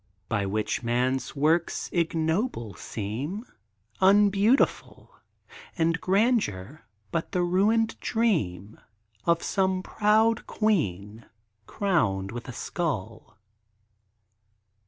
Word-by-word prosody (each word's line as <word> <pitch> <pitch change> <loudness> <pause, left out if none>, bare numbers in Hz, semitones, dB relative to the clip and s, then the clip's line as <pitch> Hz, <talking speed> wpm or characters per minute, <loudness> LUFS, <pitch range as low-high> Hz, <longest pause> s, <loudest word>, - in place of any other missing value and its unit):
By 100 -3 0
which 105 +2 -1
man's 125 +4 -1
works 160 +4 +1
ignoble 165 - -1
seem, 130 - -5 0.6
Unbeautiful; 205 +5 +3 0.7
And 165 +1 +1
grandeur, 185 - 0 0.2
but 165 - -3
the 180 - +1
ruined 215 +6 +2
dream 110 - -1 0.5
Of 170 0 +2
some 190 -1 0
proud 220 +3 +2
queen, 110 - -1 0.4
crowned 100 - 0
with 120 0 -7
a - - -5
skull. 115 - -4
165 Hz, 85 wpm, -26 LUFS, -, 0.7 s, Unbeautiful